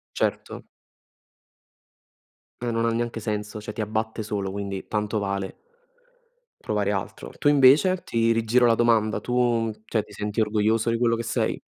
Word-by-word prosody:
Certo. - - -2 2.0
E 120 - -2
non 115 0 0
ha 115 - +2
neanche 115 0 -2
senso, 105 0 -4
cioè 105 0 -7
ti - - -3
abbatte 110 +1 -2
solo, 100 -2 -3
quindi 100 -1 -5
tanto 105 0 -1
vale 100 -1 -3 1.1
provare 105 -2 0
altro. 95 -2 -5
Tu 145 - +3
invece, 145 +7 +5
ti 115 0 +1
rigiro 115 +2 +3
la 115 - +5
domanda, 115 -2 +2
tu, 120 -2 +1
cioè 110 0 -1
ti - - -16
senti 105 +1 -3
orgoglioso 110 +1 +1
di 115 - +1
quello 115 -1 +2
che 115 - -3
sei? - - -1
110 Hz, 155 wpm, -25 LUFS, 105-115 Hz, 2.0 s, invece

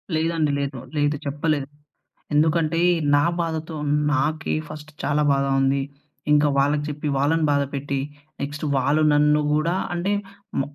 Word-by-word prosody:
లేదండి. 160 -2 +1
లేదు. 140 -2 -3 0.2
లేదు. 145 0 +2
చెప్పలేదు. 145 -1 -1 0.7
ఎందుకంటే, 160 +2 +2 0.4
నా 145 - +3
బాధతో 160 -1 -3 0.4
నాకే 155 +3 0
ఫస్ట్ 155 0 -10
చాలా 150 +1 +1
బాధ 140 0 +2 0.2
ఉంది. 135 +1 +2 0.5
ఇంక 150 0 +5
వాళ్ళకి 145 +2 +2
చెప్పి 150 0 -4
వాళ్ళని 155 +3 +2
బాధ 140 -1 +2
పెట్టి, 140 0 -2 0.4
నెక్స్ట్ 145 +2 -5
వాళ్ళు 140 +4 +2
నన్ను 150 +1 +4
గూడా 165 +4 +1 0.2
అంటే, 175 +4 -1 0.5
మ - - +3
150 Hz, 135 wpm, -23 LUFS, 140-155 Hz, 0.7 s, ఇంక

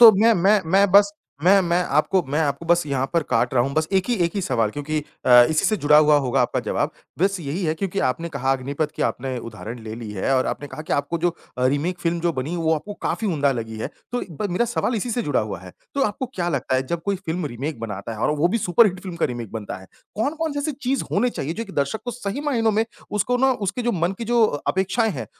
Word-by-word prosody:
तो 230 -2 +12
मैं 225 +4 +5
मैं 200 +4 +4
मैं 200 0 +5
बस 200 0 +6 0.3
मैं 195 +2 +7
मैं 175 +1 +1 0.2
आपको 185 +3 +2
मैं 155 - +2
आपको 145 +2 -1
बस 175 0 +4
यहाँ 135 -1 0
पर 170 -2 +2
काट 130 - +1
रहा 120 - +4
हूँ 135 +2 -2
बस 155 0 +1
एक 190 -1 +2
ही 240 - +2
एक 170 - -1
ही 200 - 0
सवाल 115 -8 +1
क्योंकि 150 +3 -3 0.3
अ, - - +3 0.2
इसी 155 - +1
से 215 - +3
जुड़ा 150 -3 +4
हुआ 150 -1 +6
होगा 130 -3 +1
आपका - - 0
जवाब, - - -1 0.3
बस 195 +1 +2
यही 160 +5 -3
है 155 0 +1
क्योंकि 195 +2 -3
आपने 165 +7 -3
कहा 135 -3 0
अग्निपथ 140 +3 -2
की - - -1
आपने 130 0 -2
उदाहरण 115 +1 -7
ले 110 - -5
ली 115 -2 -7
है 105 +7 0
और 130 - +1
आपने 145 - -3
कहा 155 - -7
कि - - -4
आपको 145 +4 0
जो 175 +1 +2 0.3
अ, 125 - +3
रीमेक 155 +7 0
फ़िल्म 170 0 0
जो 170 0 +1
बनी 140 +6 -3
वो 160 -1 +2
आपको 205 +7 -5
काफ़ी 225 - -1
उम्दा 145 -6 +2
लगी 110 -2 -5
है। - - -3 0.2
तो 245 - 0
ब 205 +7 -3
मेरा 180 +7 +2
सवाल 240 +1 -1
इसी 235 +4 -2
से 240 +1 0
जुड़ा 145 -3 +1
हुआ 100 -5 -4
है। 90 0 -11 0.2
तो 275 - +1
आपको 210 +5 -2
क्या 175 -1 -1
लगता 135 -4 -1
है 130 - +1
जब 170 +1 -3
कोई 200 -1 0
फ़िल्म 165 0 -2
रीमेक 135 +1 -5
बनाता 105 0 -5
है 110 - -7
और - - +2
वो 170 +4 +3
भी 230 +5 0
सुपरहिट 185 0 +3
फ़िल्म 185 -3 -7
का 170 - +1
रीमेक 120 -4 -6
बनता 110 -3 -5
है, 95 - -14 0.3
कौन-कौन 310 +7 -1
सी 285 - -3
ऐसी 300 +1 -1
चीज 265 0 -1
होनी 240 +5 +2
चाहिए 155 -4 -3
जो 230 - -4
कि 200 - -12
दर्शक 145 +9 -1
को 245 - -2
सही 240 +2 -4
मायनों 240 -7 +1
में, 220 +2 +2 0.3
उसको 225 +4 +1
ना 265 +1 +3
उसके 205 +7 -2
जो 240 0 +1
मन 175 +1 0
की 230 - -4
जो 235 0 +4 0.2
अपेक्षाएँ 195 +4 +1
हैं 130 - -5
170 Hz, 265 wpm, -23 LUFS, 140-205 Hz, 0.3 s, तो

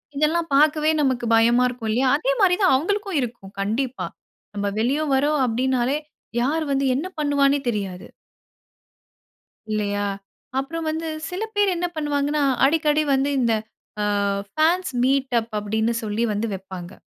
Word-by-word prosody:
இதெல்லாம் 320 +3 +1
பார்க்கவே 305 +1 +4
நமக்கு 260 -4 0
பயமா 235 +2 +4
இருக்கும் 240 -3 -5
இல்லையா, 255 +4 +2
அதே - - 0
மாரி 360 -2 +5
தான் 370 -8 +5
அவங்களுக்கும் 395 +4 -1
இருக்கும் 225 -5 -6
கண்டிப்பா. 240 +6 -2 0.5
நம்ம 200 0 -1
வெளிய 265 +7 +1
வறோம் 290 +2 +2
அப்படின்னாலே, 255 +3 +1 0.4
யார் 305 +6 0
வந்து 275 0 +1
என்ன 300 +8 -2
பண்ணுவானே 285 -1 +2
தெரியாது 195 -5 -4 1.6
இல்லையா? 205 -1 -1 0.5
அப்புறம் 325 +4 -4
வந்து 320 +1 -3 0.2
சில 360 +3 -5
பேர் 405 -2 +3
என்ன 350 +1 -1
பண்ணுவாங்கணா, 295 -1 0 0.2
அடிக்கடி 305 +1 +2
வந்து 270 +1 +2
இந்த 235 -3 +2 0.5
ஆ - - +1 0.5
ஃபேன்ஸ் 345 - +2
மீட் 265 0 +1
அப் 230 +1 -8
அப்படின்னு 220 +3 0
சொல்லி 215 +2 -1
வந்து 210 +2 -1
வப்பாங்க. 190 -2 -8
270 Hz, 135 wpm, -23 LUFS, 230-310 Hz, 1.6 s, மாரி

